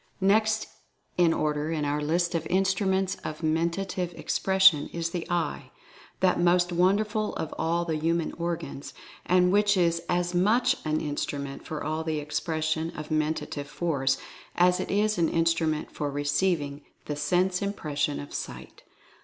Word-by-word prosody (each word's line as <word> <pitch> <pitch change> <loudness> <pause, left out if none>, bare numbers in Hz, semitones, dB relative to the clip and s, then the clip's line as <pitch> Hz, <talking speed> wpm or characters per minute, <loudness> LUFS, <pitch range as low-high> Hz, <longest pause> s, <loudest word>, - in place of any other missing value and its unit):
Next 215 +3 +3 0.5
in 175 -2 +4
order 150 -1 -1
in 155 -2 -1
our 145 +1 -1
list 170 +4 0
of 165 -1 -2
Instruments 190 0 +1
of 155 +1 -5
Menta 170 +4 0
tive 175 -3 -3
Expression 190 -6 +3
is 170 0 -3
The 175 -1 -4
Eye, 175 -1 -2 0.5
that 185 -2 +3
most 175 +1 +3
wonderful 205 +4 +1
of 160 - -4
all 170 +1 0
the 160 -2 -1
human 165 +1 0
organs, 170 -5 -5 0.3
and 180 0 +4
which 205 0 +3
is 170 -2 +2
as 175 0 0
much 215 +8 +3
an 155 0 +1
instru 145 -1 -3
ment 140 -1 -7
for 155 +1 -3
the 160 -1 -2
Expression 155 +2 -1
of 150 0 -6
Mentative 155 -2 -1
For^'as 170 +3 0
it - - -3
is 210 0 +1
an 165 - +3
instrument 165 -2 +1
for 145 - -3
receiving 145 +1 0 0.2
the 150 - -3
sense 180 +5 +1
impression 150 -8 -2
of 145 - -8
Sight. - - -7
170 Hz, 150 wpm, -27 LUFS, 155-185 Hz, 0.5 s, in